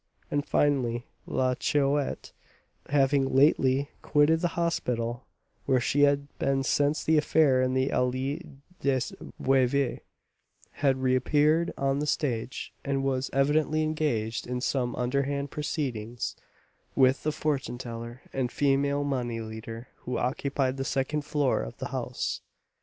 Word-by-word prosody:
And, 145 0 +1
finally, 125 -6 +1 0.2
La 130 -1 +1
Chouette, 140 +2 0 0.6
having 135 -1 +2
lately 135 0 +4
quitted 150 +2 +3
the 175 - +1
hospital, 120 -8 -1 0.4
where 130 - +4
she 140 +4 +1
had 140 0 +3
been 135 0 +1
since 145 +3 +1
the 160 -1 +4
affair 145 -4 +3
in 130 0 +1
the 130 +1 +2
Allée 130 +3 0 0.4
des 135 -2 +1 0.4
Veuves, 135 0 +2 0.7
had 135 -2 0
reappeared 150 +6 +3
on 135 0 +1
the 150 - -1
stage, 130 -5 -2
and 135 -1 -1
was 135 -1 0
evidently 150 +3 +2
engaged 135 -8 -1
in 125 0 -2
some 125 -1 -1
underhand 140 +3 -1
proceedings 125 -7 -3 0.6
with 130 0 +4
the 155 - 0
fortune 140 -6 -2
teller 120 -1 -7
and 130 -2 -1
female 140 0 +2
money 125 -5 -2
lender 115 +1 -7
who 125 0 -4
occupied 135 +1 -1
the 135 - -1
second 135 +3 -1
floor 145 -3 +1
of - - -7
the - - -5
house. - - -3
135 Hz, 130 wpm, -28 LUFS, 125-145 Hz, 0.7 s, lately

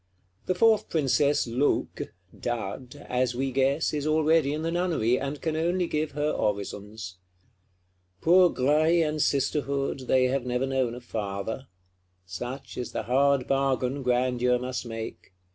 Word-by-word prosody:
The 185 - +1
fourth 220 +1 +3
Princess 145 -1 +2
Loque 125 +5 -1 0.3
(Dud), 120 +4 -5
as 125 -1 0
we 135 +1 -1
guess, 135 +5 +1
is 150 0 -1
already 155 -1 +3
in 155 +2 -3
the 165 - -1
Nunnery, 165 -9 +1
and 140 +1 -4
can 160 -1 -2
only 175 +3 +1
give 155 -2 -2
her 150 +1 0
orisons. 100 -1 -3 1.0
Poor 180 +2 +6
Graille 155 +5 +3
and 150 0 -2
Sisterhood, 140 -1 0
they 130 -1 +4
have 130 0 +1
never 125 +1 -1
known 130 -3 0
a 125 - -9
Father: 110 +2 -4 0.6
such 120 +10 -7
is 125 - -5
the - - -2
hard 135 +1 +2
bargain 135 0 0
Grandeur 125 0 +2
must 125 0 -4
make. 115 -4 -7
135 Hz, 145 wpm, -27 LUFS, 125-150 Hz, 1.0 s, Poor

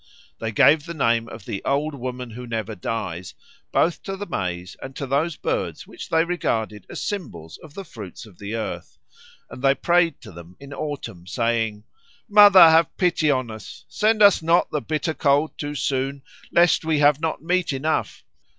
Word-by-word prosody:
They 110 0 -3
gave 145 - +4
the 170 - -6
name 115 -5 +1
of 110 -3 -11
the 100 - -5
Old 145 +2 0
Woman 125 -2 -6
who 125 +2 -8
Never 110 -2 -3
Dies 90 -3 -5 0.4
both 165 -1 +1
to 195 0 -6
the 205 - -5
maize 90 - -4
and 135 0 -8
to 140 - -4
those 145 +5 0
birds - - -3
which - - -10
they 165 0 +3
regarded 110 - -2
as - - -6
symbols 85 - -6
of 155 -2 -15
the 195 - -6
fruits 105 - -10
of 100 -5 -18
the 105 +2 -5
earth, 110 - -6 0.5
and - - -11
they 135 0 +4
prayed 170 -2 +2
to - - -11
them 85 +1 -13
in 140 0 -10
autumn 140 - -6
saying, 115 -1 -1 0.4
"Mother, 205 -4 +8
have 165 0 +3
pity 175 -4 +2
on 130 -4 0
us! 110 -1 -11
send 215 0 +2
us 200 -3 +6
not 165 +2 +2
the 150 - -1
bitter 155 +2 -2
cold 145 +1 +1
too 145 0 -5
soon, 135 0 -2 0.3
lest 170 -1 +4
we 160 -1 +1
have 145 0 +4
not 160 -1 -2
meat 180 -1 0
enough! 145 +4 -2
140 Hz, 185 wpm, -23 LUFS, 110-160 Hz, 0.5 s, Mother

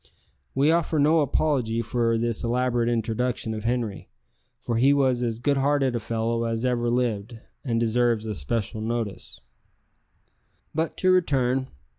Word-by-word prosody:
We 140 +4 +4
offer 165 -1 +1
no 155 +3 +4
apology 130 -5 0
for 115 0 0
this 115 0 -1
elaborate 120 0 +1
introduction 115 0 -1
of 110 0 -6
Henri, 115 -4 -2 0.5
for 115 - -2
he 135 +4 +5
was 130 -3 +2
as 115 -2 -1
good 140 +4 +1
hearted 135 -2 +1
a - - 0
fellow 115 +1 -1
as 115 +1 -2
ever 120 -1 0
lived, 120 -2 -1 0.3
and 115 -4 0
deserves 115 -1 +1
special 110 - -2
notice. 115 -3 -4 1.3
But 160 +1 -2
to 185 - +3
return. 135 -7 +2
120 Hz, 140 wpm, -25 LUFS, 115-135 Hz, 1.3 s, he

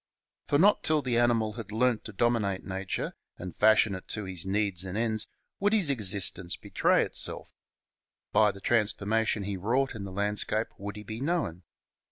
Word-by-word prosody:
For 145 - +2
not 200 +7 +4
till 155 -2 +2
the 120 -2 +1
animal 115 -3 +2
had 110 -2 -8
learnt 115 +1 +1
to 110 - -7
dominate 105 -3 0
nature 95 0 -3 0.2
and 90 -1 -8
fashion 110 -1 +4
it 95 - -8
to 105 - -3
his 95 -2 -4
needs 100 -2 0
and 95 +1 -5
ends 110 -1 0 0.3
would 205 +2 +2
his 190 -10 +4
existence 95 -6 +1
betray - - +1
itself. - - -1 0.8
By 105 -1 +4
the 100 - -13
transformation 110 -1 +1
he 100 0 -3
wrought 125 +9 0
in 110 -4 -7
the 95 - -7
landscape 105 +2 -1
would 100 +1 -6
he 105 - -8
be 110 +3 -7
known. 145 - -1
105 Hz, 175 wpm, -28 LUFS, 100-120 Hz, 0.8 s, not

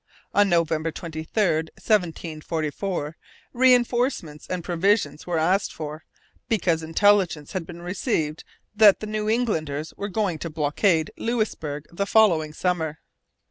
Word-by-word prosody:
On 205 -1 +4
November 165 -2 +1
23, 160 -1 -6
1744, 165 -3 -1 0.4
reinforcements 245 - +2
and 180 -2 -3
provisions 175 -4 0
were 175 -2 0
asked 180 +5 +1
for, 155 0 -7 0.4
because 175 -7 +1
intelligence 170 -2 +2
had 180 -3 -4
been 175 0 -9
received 175 - -2 0.3
that 210 -2 +7
the - - -5
New 215 0 -2
Englanders 160 -11 -1
were 205 - -4
going 190 -5 -1
to 165 - -4
blockade 155 +2 +1
Louisbourg 185 -11 -2
the 200 +4 -2
following 175 -8 +4
summer. 160 -2 -1
170 Hz, 120 wpm, -24 LUFS, 155-205 Hz, 0.4 s, that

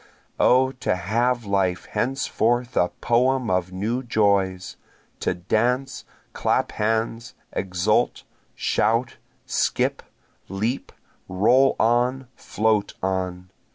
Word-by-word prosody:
O 130 +1 +4
to 125 -7 -1
have 115 +6 0
life 95 -3 0
henceforth 120 +1 -1
a 90 - +3
poem 125 -1 +2
of 90 0 0
new 110 +7 -2
joys! 100 -6 0 0.4
To 90 - -1
dance, 120 +9 -1 0.3
clap - - 0
hands, 115 +2 -2 0.2
exult, 90 -2 0 0.3
shout, 115 +5 0 0.3
skip, - - 0 0.5
leap, 110 +7 -2 0.4
roll 125 +9 +4
on, 125 +3 +1
float 110 -1 0
on! 90 -1 -3
110 Hz, 95 wpm, -23 LUFS, 95-125 Hz, 0.5 s, O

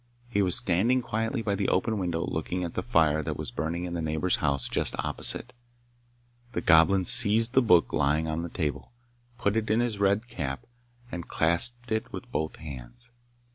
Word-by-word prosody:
He 105 -4 -1
was 90 -3 +6
standing 115 +9 +2
quietly 115 +2 -3
by 100 -1 -1
the 100 -1 -1
open 105 +3 -1
window 85 -3 -2
looking 90 +3 -4
at 85 - -5
the - - -3
fire 80 -9 +1
that 75 - -5
was - - -6
burning 80 +7 -4
in 85 - -6
the 85 - -3
neighbour's 80 +3 -1
house 70 -4 -1
just - - 0
opposite. 125 - -1 1.0
The - - -3
Goblin 90 +4 +4
seized 110 +6 +6
the 130 - +4
book 90 -8 +3
lying 75 +2 0
on 80 +1 -3
the 85 - -6
table, 75 -6 -4 0.5
put 100 -1 -1
it 110 -1 -2
in 110 +2 +2
his 120 -4 -2
red 100 +3 +1
cap, 70 - -6 0.5
and 85 -1 -7
clasped 115 +10 +3
it 110 0 -3
with - - -9
both 80 0 -3
hands. 70 - -12
90 Hz, 185 wpm, -26 LUFS, 80-110 Hz, 1.0 s, was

